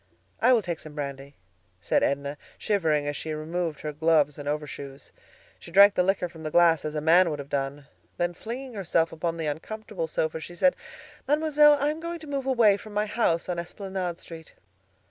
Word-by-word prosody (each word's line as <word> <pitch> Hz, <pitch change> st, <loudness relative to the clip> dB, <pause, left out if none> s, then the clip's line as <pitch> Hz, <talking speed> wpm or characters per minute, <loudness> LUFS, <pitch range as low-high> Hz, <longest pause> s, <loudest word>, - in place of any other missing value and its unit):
"I 255 Hz, -, +5 dB
will 235 Hz, -4 st, +4 dB
take 170 Hz, -3 st, -3 dB
some 155 Hz, -1 st, -11 dB
brandy," 140 Hz, -1 st, -6 dB, 0.4 s
said 85 Hz, -, +1 dB
Edna, 140 Hz, +1 st, -1 dB, 0.2 s
shivering 160 Hz, -9 st, +1 dB
as 145 Hz, -, -2 dB
she 155 Hz, +2 st, -4 dB
removed 160 Hz, 0 st, -3 dB
her 150 Hz, -1 st, -4 dB
gloves 150 Hz, -2 st, +2 dB
and 145 Hz, 0 st, -4 dB
overshoes. 145 Hz, -2 st, -6 dB, 0.5 s
She -, -, -12 dB
drank 200 Hz, +3 st, +7 dB
the 180 Hz, -, +2 dB
liquor 190 Hz, 0 st, +1 dB
from 165 Hz, -2 st, -13 dB
the 155 Hz, -, -4 dB
glass 165 Hz, -1 st, +4 dB
as 155 Hz, 0 st, -4 dB
a 150 Hz, -, -1 dB
man 170 Hz, +3 st, +5 dB
would 150 Hz, -, -3 dB
have 140 Hz, 0 st, -9 dB
done. 140 Hz, +1 st, -2 dB, 0.3 s
Then 175 Hz, 0 st, 0 dB
flinging 245 Hz, +7 st, -7 dB
herself 170 Hz, -5 st, 0 dB
upon 165 Hz, +1 st, -3 dB
the 165 Hz, -, -3 dB
uncomfortable 170 Hz, +4 st, -4 dB
sofa 160 Hz, 0 st, -2 dB
she 175 Hz, +2 st, -9 dB
said, 270 Hz, +9 st, +3 dB, 0.5 s
"Mademoiselle, 300 Hz, 0 st, +5 dB
I 290 Hz, +2 st, +1 dB
am 310 Hz, -, -6 dB
going 335 Hz, +1 st, -5 dB
to 320 Hz, -, -11 dB
move 275 Hz, -2 st, -3 dB
away 230 Hz, -6 st, +4 dB
from 210 Hz, 0 st, -12 dB
my 210 Hz, +1 st, +1 dB
house 210 Hz, -6 st, 0 dB
on 175 Hz, -2 st, -2 dB
Esplanade 180 Hz, 0 st, -5 dB
Street." 160 Hz, -1 st, -11 dB
170 Hz, 200 wpm, -26 LUFS, 150-210 Hz, 0.5 s, drank